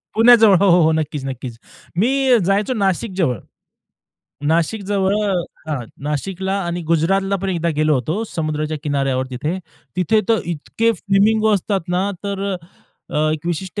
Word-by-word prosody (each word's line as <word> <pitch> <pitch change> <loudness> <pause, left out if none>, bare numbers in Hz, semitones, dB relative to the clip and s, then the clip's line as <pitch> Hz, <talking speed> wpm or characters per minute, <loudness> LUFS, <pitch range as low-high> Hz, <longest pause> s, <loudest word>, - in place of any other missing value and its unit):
पुण्याजवळ, 225 -3 +7
हो, 200 0 +4
हो, 175 +1 +6
हो, 160 - +4
नक्कीच, 150 -3 -2
नक्कीच. 130 -3 -6 0.4
मी 215 +7 +3 0.4
जायचो 200 +6 +1
नाशिक 200 -1 0
जवळ. 130 - +1 1.1
नाशिकजवळ, 195 +4 +1
अ, 200 - +1 0.4
हां, 140 -6 -2 0.2
नाशिकला, 190 +6 -2
आणि 175 0 -3
गुजरातला 195 +5 +2
पण 195 - -1
एकदा 170 -2 -1
गेलो 155 0 +3
होतो 155 - -1
समुद्राच्या 155 -1 -2
किनाऱ्यावर 135 -3 0
तिथे. 150 +8 -3 0.4
तिथे 185 +5 +3
तर 225 -3 +3
इतके 225 +9 0
फ्लेमिंगो 215 +1 +2
असतात 200 0 0 0.2
ना, 195 +2 0
तर 200 -1 -3 0.7
अ, - - -3 0.2
एक 155 +1 -5
विशिष्ट 175 +4 -3
180 Hz, 145 wpm, -19 LUFS, 155-200 Hz, 1.1 s, पुण्याजवळ